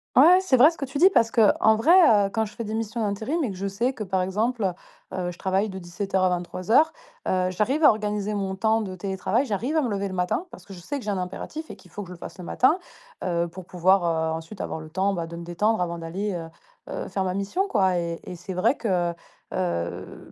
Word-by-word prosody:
Ouais, 340 Hz, +8 st, +8 dB
c'est 330 Hz, -9 st, +3 dB
vrai 280 Hz, +6 st, +7 dB
ce 330 Hz, -, -14 dB
que 275 Hz, -, -3 dB
tu 270 Hz, +2 st, -5 dB
dis, 360 Hz, +6 st, +7 dB
parce 230 Hz, -10 st, +4 dB
qu'en 220 Hz, -1 st, +4 dB
vrai, 225 Hz, +10 st, +3 dB, 0.4 s
heu, -, -, -7 dB
quand 220 Hz, -, +1 dB
je 210 Hz, -, -10 dB
fais 230 Hz, -, -4 dB
des 215 Hz, 0 st, -5 dB
missions 225 Hz, +1 st, -3 dB
d'intérim 220 Hz, +10 st, -1 dB
et 240 Hz, -, -1 dB
que -, -, -7 dB
je 195 Hz, +2 st, -3 dB
sais 235 Hz, +7 st, -1 dB
que, 225 Hz, -, -5 dB
par 190 Hz, -2 st, 0 dB
exemple, 210 Hz, +1 st, 0 dB, 0.4 s
heu, 180 Hz, -1 st, -2 dB
je 170 Hz, -, -13 dB
travaille 195 Hz, +3 st, 0 dB
de 190 Hz, -, -7 dB
17:00 190 Hz, +2 st, -2 dB
à 185 Hz, -, +4 dB
23:00, 185 Hz, -, +2 dB, 0.4 s
heu, 185 Hz, 0 st, +1 dB
j'arrive 245 Hz, -, 0 dB
à -, -, +9 dB
organiser 210 Hz, -1 st, -1 dB
mon 195 Hz, -2 st, -2 dB
temps 220 Hz, +3 st, +2 dB
de 190 Hz, -3 st, -5 dB
télétravail. 195 Hz, +6 st, -1 dB
J'arrive 250 Hz, +7 st, -1 dB
à -, -, +4 dB
me -, -, 0 dB
lever 200 Hz, -1 st, -1 dB
le 185 Hz, -, -6 dB
matin 180 Hz, -, -1 dB
parce -, -, -13 dB
que 200 Hz, -, -11 dB
je 180 Hz, -, -10 dB
sais 285 Hz, +12 st, -4 dB
que 260 Hz, -, -8 dB
j'ai 210 Hz, -, -1 dB
un 195 Hz, -, -1 dB
impératif 250 Hz, -, -6 dB
et -, -, -7 dB
qu'il 180 Hz, -, -20 dB
faut 205 Hz, -, -6 dB
que 195 Hz, -, -8 dB
je 180 Hz, -, -8 dB
le -, -, -11 dB
fasse 175 Hz, -, -10 dB
le -, -, -7 dB
matin, 280 Hz, -, +2 dB, 0.4 s
heu, 170 Hz, -1 st, 0 dB
pour 175 Hz, +2 st, -10 dB
pouvoir, 185 Hz, +2 st, +3 dB
heu, 160 Hz, -1 st, 0 dB
ensuite 165 Hz, +5 st, -8 dB
avoir -, -, -4 dB
le 155 Hz, 0 st, -10 dB
temps, 190 Hz, +4 st, 0 dB
bah, 170 Hz, -3 st, -3 dB
de 170 Hz, -, -8 dB
me 170 Hz, -, -7 dB
détendre 205 Hz, +6 st, 0 dB
avant 170 Hz, -1 st, -2 dB
d'aller, 190 Hz, +5 st, -3 dB
heu 165 Hz, -2 st, -5 dB, 0.4 s
heu, -, -, -4 dB
faire 195 Hz, -, -2 dB
ma 185 Hz, -1 st, -2 dB
mission, 205 Hz, -, -1 dB
quoi 190 Hz, -, +2 dB
et 170 Hz, -1 st, -3 dB
et 180 Hz, -, -7 dB
c'est 180 Hz, +2 st, -7 dB
vrai 185 Hz, +9 st, +2 dB
que, 230 Hz, -, -4 dB, 0.2 s
heu -, -, -9 dB, 0.4 s
heu, 85 Hz, -, -3 dB
195 Hz, 265 wpm, -25 LUFS, 180-225 Hz, 0.4 s, à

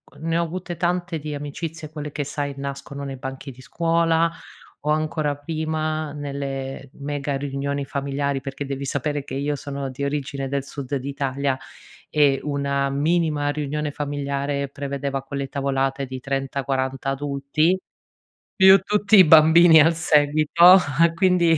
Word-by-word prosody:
Uhm, 155 Hz, +3 st, -7 dB
ne 165 Hz, 0 st, +1 dB
ho -, -, +2 dB
avute 175 Hz, +1 st, -5 dB
tante 175 Hz, -1 st, -1 dB
di 150 Hz, 0 st, -5 dB
amicizie 155 Hz, +2 st, -6 dB
quelle 150 Hz, -1 st, -6 dB
che 145 Hz, 0 st, -3 dB
sai 140 Hz, 0 st, -4 dB
nascono 140 Hz, 0 st, -6 dB
nei 135 Hz, -1 st, -6 dB
banchi 135 Hz, +1 st, -7 dB
di 130 Hz, -, -15 dB
scuola, 165 Hz, +2 st, +1 dB, 0.5 s
o -, -, 0 dB
ancora 155 Hz, -1 st, 0 dB
prima, 155 Hz, 0 st, -3 dB
nelle 140 Hz, -2 st, -5 dB
mega 145 Hz, -1 st, -3 dB
riunioni 140 Hz, 0 st, -3 dB
familiari, 140 Hz, 0 st, -2 dB
perché 135 Hz, +1 st, -5 dB
devi 140 Hz, 0 st, -4 dB
sapere 145 Hz, +1 st, -2 dB
che 140 Hz, -, -7 dB
io 145 Hz, +1 st, -1 dB
sono 140 Hz, -1 st, -5 dB
di 130 Hz, +2 st, -6 dB
origine 140 Hz, -1 st, -3 dB
del 140 Hz, -1 st, -2 dB
sud 140 Hz, -1 st, -5 dB
d'Italia 140 Hz, 0 st, -2 dB, 0.5 s
e 145 Hz, -3 st, +3 dB
una 140 Hz, -1 st, -1 dB
minima 150 Hz, +1 st, +1 dB
riunione 150 Hz, 0 st, -2 dB
familiare 140 Hz, -1 st, -2 dB
prevedeva 140 Hz, -1 st, -4 dB
quelle 140 Hz, 0 st, -4 dB
tavolate 135 Hz, 0 st, -1 dB
di 130 Hz, 0 st, -7 dB
30, 135 Hz, +1 st, -3 dB
40 135 Hz, 0 st, -1 dB
adulti, 145 Hz, +5 st, 0 dB, 0.7 s
più 190 Hz, 0 st, +8 dB
tutti 210 Hz, +2 st, +2 dB
i 190 Hz, -, +10 dB
bambini 160 Hz, +1 st, +7 dB
al 165 Hz, +3 st, +5 dB
seguito, 155 Hz, +3 st, +5 dB, 0.4 s
quindi 175 Hz, -3 st, +3 dB
145 Hz, 145 wpm, -23 LUFS, 140-155 Hz, 0.7 s, i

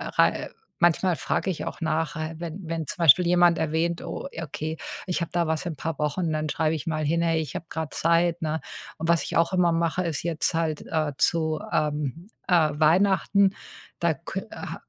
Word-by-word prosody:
rei -, -, +6 dB
äh, -, -, -6 dB, 0.3 s
manchmal 175 Hz, 0 st, +3 dB
frage 190 Hz, -, -1 dB
ich 170 Hz, -, -5 dB
auch -, -, -6 dB
nach, 155 Hz, -1 st, -1 dB
ha 155 Hz, +1 st, -3 dB
wenn 170 Hz, +2 st, -6 dB
wenn 165 Hz, -2 st, -3 dB
zum -, -, -6 dB
Beispiel 170 Hz, +3 st, +7 dB
jemand 175 Hz, -1 st, +5 dB
erwähnt: 160 Hz, +2 st, 0 dB
„Oh, -, -, -5 dB
ja, 165 Hz, -, -5 dB
okay, 155 Hz, +2 st, -5 dB, 0.3 s
ich 180 Hz, -1 st, -1 dB
habe 170 Hz, -, -2 dB
da 170 Hz, -1 st, +2 dB
was 160 Hz, +2 st, -1 dB
in 175 Hz, -, -2 dB
'n -, -, -12 dB
paar 160 Hz, +2 st, -4 dB
Wochen.“ 155 Hz, +3 st, 0 dB
Dann 155 Hz, 0 st, -1 dB
schreibe 155 Hz, +1 st, 0 dB
ich 155 Hz, -1 st, -4 dB
mal 155 Hz, -1 st, -1 dB
hin: 165 Hz, +3 st, +1 dB
„Hey, 165 Hz, -1 st, +2 dB
ich 150 Hz, -4 st, -7 dB
habe 165 Hz, -, -4 dB
grad 160 Hz, -2 st, -4 dB
Zeit,“ 170 Hz, +1 st, +2 dB
ne? 160 Hz, 0 st, -1 dB, 0.4 s
Und 160 Hz, +1 st, -3 dB
was 170 Hz, -3 st, +4 dB
ich -, -, -5 dB
auch 165 Hz, +2 st, +3 dB
immer 180 Hz, -2 st, +3 dB
mache, 170 Hz, +2 st, 0 dB
ist 160 Hz, -4 st, -2 dB
jetzt 170 Hz, 0 st, 0 dB
halt, 160 Hz, -2 st, -1 dB
äh, 155 Hz, -2 st, 0 dB
zu, 160 Hz, -2 st, +1 dB
ähm, 150 Hz, +2 st, -1 dB, 0.2 s
äh, 170 Hz, -4 st, +4 dB
Weihnachten, 190 Hz, +4 st, +4 dB, 0.5 s
da -, -, +2 dB
kö -, -, -6 dB
äh, -, -, -6 dB
165 Hz, 215 wpm, -25 LUFS, 155-170 Hz, 0.5 s, Beispiel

